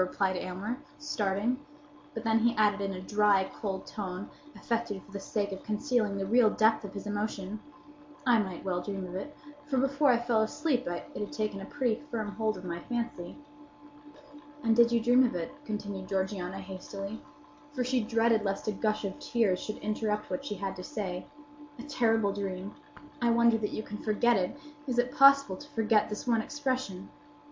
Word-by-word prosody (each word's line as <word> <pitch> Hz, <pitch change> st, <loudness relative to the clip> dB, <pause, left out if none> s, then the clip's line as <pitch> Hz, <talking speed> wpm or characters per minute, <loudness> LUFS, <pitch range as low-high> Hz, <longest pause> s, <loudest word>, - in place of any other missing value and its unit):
replied 190 Hz, +1 st, +1 dB
Aylmer, 195 Hz, +8 st, -3 dB, 0.2 s
starting; 235 Hz, -1 st, -1 dB, 0.5 s
but 225 Hz, -, -4 dB
then 225 Hz, -1 st, +3 dB
he 235 Hz, +2 st, +3 dB
added, 210 Hz, -2 st, +3 dB
in 195 Hz, 0 st, -1 dB
a 185 Hz, -, -5 dB
dry, 205 Hz, 0 st, +3 dB
cold 195 Hz, -3 st, -4 dB
tone, 190 Hz, -1 st, -5 dB, 0.2 s
affected 230 Hz, -4 st, -2 dB
for -, -, -18 dB
the 200 Hz, -, -5 dB
sake 200 Hz, 0 st, -2 dB
of 190 Hz, -, -5 dB
concealing 215 Hz, -2 st, 0 dB
the 195 Hz, -, -1 dB
real 230 Hz, +2 st, +5 dB
depth 220 Hz, +1 st, +3 dB
of 200 Hz, -1 st, -8 dB
his 200 Hz, -, -5 dB
emotion, 205 Hz, -1 st, -3 dB, 0.7 s
"I 240 Hz, -3 st, +5 dB
might 190 Hz, -4 st, -3 dB
well 180 Hz, -2 st, 0 dB
dream 195 Hz, -1 st, -4 dB
of 180 Hz, -, -8 dB
it; 285 Hz, +11 st, -6 dB, 0.3 s
for 270 Hz, -3 st, 0 dB
before 275 Hz, +2 st, +3 dB
I 245 Hz, -, +6 dB
fell 235 Hz, -2 st, +2 dB
asleep 255 Hz, -, 0 dB
it 175 Hz, 0 st, -5 dB
had 205 Hz, -, -4 dB
taken 215 Hz, -2 st, -2 dB
a -, -, -6 dB
pretty 250 Hz, -5 st, 0 dB
firm 220 Hz, -4 st, -2 dB
hold 220 Hz, 0 st, -1 dB
of -, -, -9 dB
my 170 Hz, -1 st, -3 dB
fancy." 230 Hz, -5 st, -4 dB, 1.3 s
"And 225 Hz, -1 st, +4 dB
you 235 Hz, -, +10 dB
did 235 Hz, -1 st, +1 dB
dream 245 Hz, +2 st, +6 dB
of 245 Hz, -, +1 dB
it?" 165 Hz, -2 st, -3 dB
continued 205 Hz, -3 st, -4 dB
Georgiana, 190 Hz, -1 st, -2 dB
hastily; 195 Hz, +2 st, -6 dB, 0.5 s
for 260 Hz, -4 st, -1 dB
she 255 Hz, 0 st, +1 dB
dreaded 225 Hz, 0 st, +3 dB
lest 195 Hz, 0 st, -2 dB
a -, -, +3 dB
gush 215 Hz, 0 st, 0 dB
of 200 Hz, +9 st, -4 dB
tears 230 Hz, -10 st, +1 dB
should 215 Hz, -, -5 dB
interrupt 215 Hz, 0 st, -1 dB
what 275 Hz, -, -2 dB
she 245 Hz, -7 st, -3 dB
had 195 Hz, 0 st, -3 dB
to 180 Hz, -, -6 dB
say. 180 Hz, -3 st, -4 dB, 0.5 s
"A 240 Hz, -, -8 dB
terrible 225 Hz, -7 st, +2 dB
dream! 195 Hz, 0 st, -4 dB, 0.5 s
I 240 Hz, -, +3 dB
wonder 235 Hz, -1 st, +5 dB
that 210 Hz, -, -1 dB
you 215 Hz, -, -4 dB
can 210 Hz, 0 st, -7 dB
forget 230 Hz, +2 st, +3 dB
it. 190 Hz, +7 st, 0 dB, 0.3 s
Is 250 Hz, -2 st, -1 dB
it 245 Hz, +1 st, +1 dB
possible 275 Hz, -7 st, +7 dB
to 290 Hz, -, -12 dB
forget 215 Hz, -3 st, +2 dB
this 210 Hz, -, -5 dB
one 230 Hz, -3 st, +3 dB
expression? 260 Hz, -8 st, -3 dB
215 Hz, 190 wpm, -30 LUFS, 195-235 Hz, 1.3 s, you